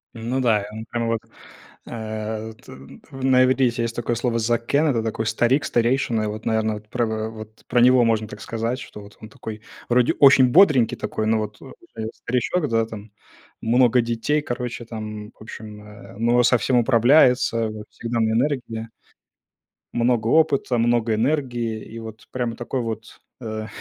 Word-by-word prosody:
Ну 120 +4 -2
да, 110 -4 +3
и - - -7
он 110 +1 -7
прямо 115 0 -3
вот, 115 -1 -1 0.6
э, 110 0 -5
т 130 0 -13 0.4
т - - -12
на 130 -1 +3
иврите 130 -1 +3
есть 115 0 -3
такое 120 0 -2
слово 120 0 -1
закэн 120 +7 +1
Это 115 -6 +1
такой 110 0 -2
старик, 120 +5 +2
старейшина. 120 -2 +1
И - - -1
вот, 110 +1 -6
наверное, 110 -1 0
вот 105 0 -12
про 120 0 0
в 110 0 -3
в - - -11
вот 110 0 -11
про 120 - +2
него 125 0 +6
можно 110 -2 +1
так - - -10
сказать, 115 +3 -3
что, 105 - -10
вот, 100 +1 -15
он 110 - -10
такой, 110 -1 -8 0.3
вроде, 125 0 +3
очень 135 -2 +6
бодренький 150 - +5
такой, 110 - -3
но 110 0 +3
вот, 105 -1 -5
о - - -11 0.2
а, 110 - -5
я, 110 - -3
старичок, 145 +6 -1
да, 115 0 +2
там, 110 -1 -10 0.5
много 125 +1 +4
детей, 120 +6 -1
короче 120 -3 -5
там, 105 -2 -7
в - - -26
общем, 105 -1 -10
э, 105 -1 -13
но 120 +2 +3
со 125 0 +4
всем 125 +1 +1
управляется, 120 -1 +4
вот 110 -1 -7
всегда 115 0 -3
на 110 0 +2
энергии 115 -3 -1 1.0
много 120 -1 +1
опыта, 140 -5 +1
много 120 -1 +2
энергии, 120 -3 -1
и 115 +1 -9
вот 110 -1 -10
прямо 120 -3 -2
такой 120 +2 -3
вот, 115 0 -6 0.2
э, 110 -1 -5
115 Hz, 185 wpm, -22 LUFS, 110-125 Hz, 1.0 s, него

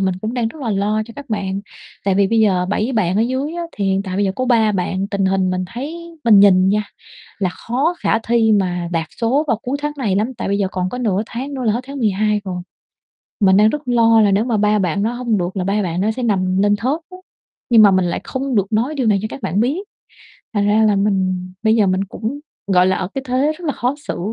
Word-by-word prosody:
mình 190 -1 +1
cũng 220 +3 -3
đang 235 -2 0
rất 290 +4 -11
là 230 - -2
lo 210 +2 0
cho 230 - -11
các 285 -3 -10
bạn, 195 -2 -2 0.4
tại 195 -1 +2
vì 200 0 +3
bây 225 0 +2
giờ 185 -4 +2
7 215 +5 -1
bạn 190 -5 +1
ở 215 - +3
dưới 260 +5 -2
á 345 - -3
thì 200 - -2
hiện 195 0 +1
tại 185 -2 -5
bây 205 - +1
giờ 190 - 0
có 255 - -1
3 225 -4 +3
bạn 190 0 -1
tình 200 -2 -1
hình 190 -1 +1
mình 185 0 -1
thấy 285 +7 -5 0.3
mình 210 -4 +7
nhìn 190 -2 +5
nha, 210 +2 +2 0.6
là 190 -3 0
khó 270 - -1
khả 225 - +1
thi 225 -1 +2
mà 180 -4 0
đạt 165 -2 -1
số 260 +7 +2
vào 230 - +2
cuối 265 +3 -2
tháng 295 0 -1
này 205 -7 0
lắm. 225 +6 -1
Tại 225 - -4
bây 200 - 0
giờ 195 -2 0
còn 185 -1 -1
có 250 - -6
nửa 210 -5 0
tháng 270 +4 -6
nữa 260 - -4
là 220 - +2
hết 235 - -1
tháng 275 0 -7
12 210 -1 +1
rồi, 180 -2 -4 0.8
mình 190 -1 +5
đang 210 +1 +6
rất 295 -3 -5
lo 230 -2 +4
là 205 - +4
nếu 200 +3 +2
mà 235 -3 0
3 210 0 +2
bạn 190 0 0
đó 225 +3 0
hông 240 -3 -1
được 180 +2 -3
là 185 - -1
3 200 +2 0
bạn 175 -1 -2
đó 210 +3 +1
sẽ 255 - -3
nằm 190 -4 +1
lên 205 0 +3
thớt 265 +9 -1
á. 365 - -10 0.5
Nhưng 225 -2 +7
mà 205 - +7
mình 185 -1 +2
lại 170 - -2
không 265 -1 -3
được 200 0 0
nói 235 +8 0
điều 260 -5 -1
này 205 -2 +3
cho 215 - -3
các - - -8
bạn 190 +6 0
biết, 265 +9 +1 0.8
thành 205 -1 +1
ra 215 +2 +3
là 210 -2 +3
mình 185 -2 0
bây 220 0 +3
giờ 210 - +3
mình 185 +1 +1
cũng, 235 +8 -5 0.3
gọi 180 0 +5
là, 185 - +2
ở 185 - -3
cái 270 - -3
thế 265 +4 +1
rất 355 - -10
là 290 - +1
khó 250 +1 -1
xử - - -3
210 Hz, 270 wpm, -19 LUFS, 190-240 Hz, 0.8 s, mình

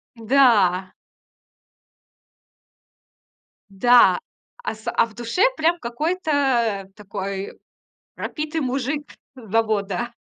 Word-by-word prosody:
Да. 220 -7 +3 2.8
Да, 240 +5 +5 0.4
а - - -3
с 220 - -5
а - - +4
в 225 - -17
душе, 240 - -3 0.2
прям, 335 +2 +2
какой-то 255 - 0
такой 195 -1 -6 0.6
пропитый 310 +1 -4
мужик 275 +3 -2 0.3
с 225 -5 -13
завода. 220 0 0
235 Hz, 80 wpm, -22 LUFS, 200-275 Hz, 2.8 s, Да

